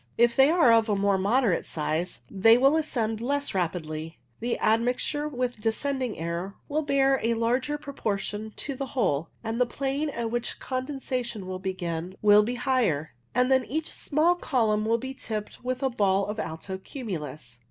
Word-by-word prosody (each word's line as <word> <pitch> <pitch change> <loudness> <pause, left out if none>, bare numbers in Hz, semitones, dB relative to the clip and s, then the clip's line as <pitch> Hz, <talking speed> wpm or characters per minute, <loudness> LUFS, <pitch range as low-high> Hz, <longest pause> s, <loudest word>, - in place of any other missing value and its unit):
If 235 0 +4
they 270 +2 +6
are 320 -8 +5
of 225 -1 +4
a 205 - +3
more 200 -1 +2
moderate 210 -1 +2
size 155 -3 -2
they 225 - +5
will 270 +4 +5
ascend 230 -8 -1
less 285 +3 0
rapidly, 165 -3 -3 0.2
the 235 +1 -1
admixture 245 +6 +1
with 250 -5 -3
descending 250 +2 -1
air 170 +4 -4
will 305 +1 0
bear 275 -2 +3
a 230 +1 +1
larger 250 +6 0
proportion 220 -7 -3
to 280 - -3
the 275 +1 -4
whole, 165 - +1
and 225 +2 -2
the 250 - +4
plane 275 +4 -2
at 235 -4 -3
which 240 0 -2
condensation 255 -5 -3
will 185 0 -5
begin 180 -1 -4
will 210 0 +7
be 235 +4 -2
higher, 230 - +1 0.2
and 250 +1 +3
then 260 -1 +4
each 315 +4 -2
small 315 +4 +2
column 225 -11 +1
will 230 +1 +3
be 265 +3 -5
tipped 215 -4 -6
with 255 +1 -2
a 265 - +3
ball 200 -4 +2
of 210 +1 -4
alto 170 +3 -5
cumulus. 150 - -6
230 Hz, 175 wpm, -27 LUFS, 195-265 Hz, 0.2 s, will